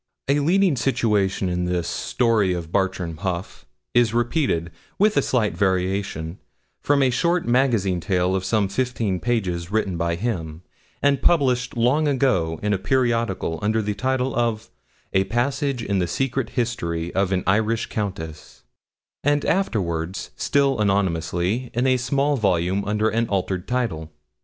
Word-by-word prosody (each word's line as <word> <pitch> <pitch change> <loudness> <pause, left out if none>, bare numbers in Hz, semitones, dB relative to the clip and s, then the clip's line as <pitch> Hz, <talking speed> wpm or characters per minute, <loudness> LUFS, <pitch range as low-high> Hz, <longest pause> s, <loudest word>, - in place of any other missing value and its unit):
A 140 +2 +3
leading 175 +2 +3
situation 105 -7 +1
in 90 0 -1
this 90 -1 -1
'Story 110 -6 +1
of 85 -2 -5
Bartram 95 -4 -1
Haugh' 90 0 -4 0.3
is 120 -2 +3
repeated, 120 - 0 0.3
with 215 +2 +3
a - - +4
slight 115 -5 0
variation, 95 -3 -1 0.4
from 140 -1 +3
a 130 - +3
short 170 +5 +1
magazine 120 -8 +2
tale 90 0 0
of 95 - -1
some 105 +1 +1
fifteen 115 -4 -1
pages 90 -8 -1
written 100 -5 0
by 85 0 0
him, 85 -6 -4 0.4
and 140 -2 +3
published 125 -7 +2
long 130 +7 +3
ago 95 - +1
in 105 0 +1
a 95 - 0
periodical 115 -9 0
under 110 +2 +1
the 105 -1 -1
title 130 +4 -1
of 115 -2 -1 0.4
'A 95 0 +3
Passage 125 +4 -1
in 100 -3 0
the 90 - 0
Secret 135 +6 -1
History 85 -9 -2
of 95 0 +1
an 90 -1 0
Irish 110 +3 +1
Countess,' 80 -7 -6 0.6
and 145 +1 +2
afterwards, 95 - -1
still 140 -3 +1
anonymously, 95 +3 0
in 120 +2 +1
a 130 -1 +3
small 140 +4 +1
volume 95 -2 +1
under 105 +1 +1
an 115 +1 0
altered 95 -2 -2
title. 110 -11 -2
105 Hz, 145 wpm, -23 LUFS, 90-125 Hz, 0.6 s, a